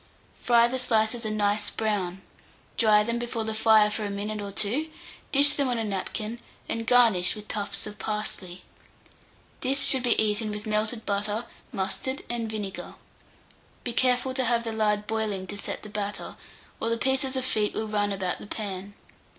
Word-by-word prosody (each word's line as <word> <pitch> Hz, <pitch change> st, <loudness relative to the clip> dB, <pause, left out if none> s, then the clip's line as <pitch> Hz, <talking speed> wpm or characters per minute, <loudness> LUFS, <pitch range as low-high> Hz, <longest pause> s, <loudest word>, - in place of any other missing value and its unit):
Fry 235 Hz, -1 st, +5 dB
the 260 Hz, +2 st, -1 dB
slices 230 Hz, -1 st, +2 dB
a -, -, 0 dB
nice 210 Hz, 0 st, +1 dB
brown, 195 Hz, -4 st, -2 dB, 0.5 s
dry 215 Hz, -2 st, +5 dB
them 235 Hz, +2 st, -1 dB
before 235 Hz, -1 st, -3 dB
the 220 Hz, 0 st, -3 dB
fire 220 Hz, -1 st, +5 dB
for 215 Hz, -, -3 dB
a 205 Hz, -, -2 dB
minute 205 Hz, +1 st, -3 dB
or 200 Hz, -1 st, -5 dB
two, 240 Hz, +11 st, 0 dB, 0.4 s
dish 285 Hz, +1 st, +7 dB
them 280 Hz, -2 st, +1 dB
on 245 Hz, -2 st, 0 dB
a 225 Hz, -, -1 dB
napkin, 215 Hz, +3 st, -3 dB, 0.3 s
and 230 Hz, 0 st, -3 dB
garnish 230 Hz, -8 st, +5 dB
with 210 Hz, 0 st, -10 dB
tufts 205 Hz, -1 st, -3 dB
of 210 Hz, -1 st, -9 dB
parsley. 200 Hz, -4 st, -4 dB, 1.0 s
This 275 Hz, +2 st, +2 dB
should 265 Hz, -, +4 dB
be 245 Hz, -1 st, +2 dB
eaten 215 Hz, 0 st, +1 dB
with 210 Hz, 0 st, -5 dB
melted 215 Hz, +1 st, -1 dB
butter, 205 Hz, +3 st, -1 dB, 0.3 s
mustard, 230 Hz, +8 st, -2 dB
and 230 Hz, -2 st, -2 dB
vinegar. 210 Hz, -3 st, -5 dB, 0.9 s
Be 240 Hz, -, -3 dB
careful 255 Hz, +1 st, +2 dB
to 260 Hz, -1 st, 0 dB
have 235 Hz, 0 st, +2 dB
the 225 Hz, -, -3 dB
lard 210 Hz, -1 st, +1 dB
boiling 215 Hz, -3 st, -2 dB
to 205 Hz, -, -6 dB
set 205 Hz, -, -5 dB
the -, -, -7 dB
batter, 205 Hz, -1 st, -4 dB, 0.4 s
or 230 Hz, -, -1 dB
the 230 Hz, -, +1 dB
pieces 265 Hz, +2 st, +1 dB
of 260 Hz, -1 st, 0 dB
feet 215 Hz, -5 st, 0 dB
will 220 Hz, -, -2 dB
run 205 Hz, -1 st, 0 dB
about 190 Hz, -2 st, -2 dB
the -, -, -10 dB
pan. 200 Hz, -2 st, -5 dB
215 Hz, 180 wpm, -27 LUFS, 205-235 Hz, 1.0 s, dish